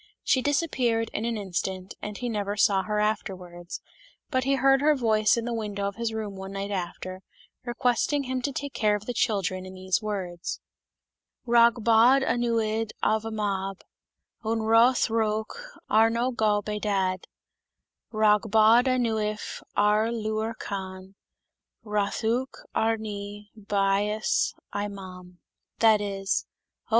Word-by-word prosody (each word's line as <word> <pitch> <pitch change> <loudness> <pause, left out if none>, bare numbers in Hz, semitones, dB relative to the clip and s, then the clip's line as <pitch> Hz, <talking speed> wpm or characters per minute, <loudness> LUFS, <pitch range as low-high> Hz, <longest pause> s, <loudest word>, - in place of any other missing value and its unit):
She 260 - +3
disappeared 255 -6 0
in 215 - -2
an 235 -1 -1
instant, 190 -1 -4
and 210 -1 -5
he 245 - -3
never 205 -2 -2
saw 195 -1 +4
her 210 +2 -2
afterwards, 180 -5 -3 0.5
but 260 -2 +1
heard 270 0 +3
her 300 +1 +4
voice 220 -4 +3
in 230 - -2
the 240 - -2
window 205 -3 -2
of 200 - -6
his 230 -1 -1
room 215 -3 -4
one 190 0 -7
night 200 +1 -4
after, 185 0 -5 0.4
requesting 250 +4 +1
him 255 -1 -2
to 280 - -1
take 280 +1 -5
care 210 -1 +2
of 210 0 -6
the 245 - -3
children, 195 -5 0
in 185 0 -9
these 185 +2 0
words: 185 -5 -4 0.4
" - - -59
Rhag 235 0 +5
bod 235 +4 +5
anwyd 225 -3 0
arfy 220 +1 +1
mab> 195 -3 -3 0.6
Yn 225 0 -1
rhodd 230 +3 +4
rhowch 220 - -1 0.2
arno 225 +3 +3
gob 210 -3 +1
ei 210 0 -2
dad: 190 -3 -1 0.8
Rhag 215 0 +3
bod 220 +3 +6
anwyd 220 -4 -1
ar 210 +2 +3
liw'r 220 0 -2
cann> 190 -1 -6 0.7
Rhoddwch 220 +4 -1
ami 205 -2 -2
bais 205 +1 0 0.2
ei 205 0 -1
mam" 185 -3 -10 0.4
That 220 -2 +5
is: 195 -1 -2 0.4
"Oh! - - -31
215 Hz, 140 wpm, -26 LUFS, 200-230 Hz, 0.8 s, bod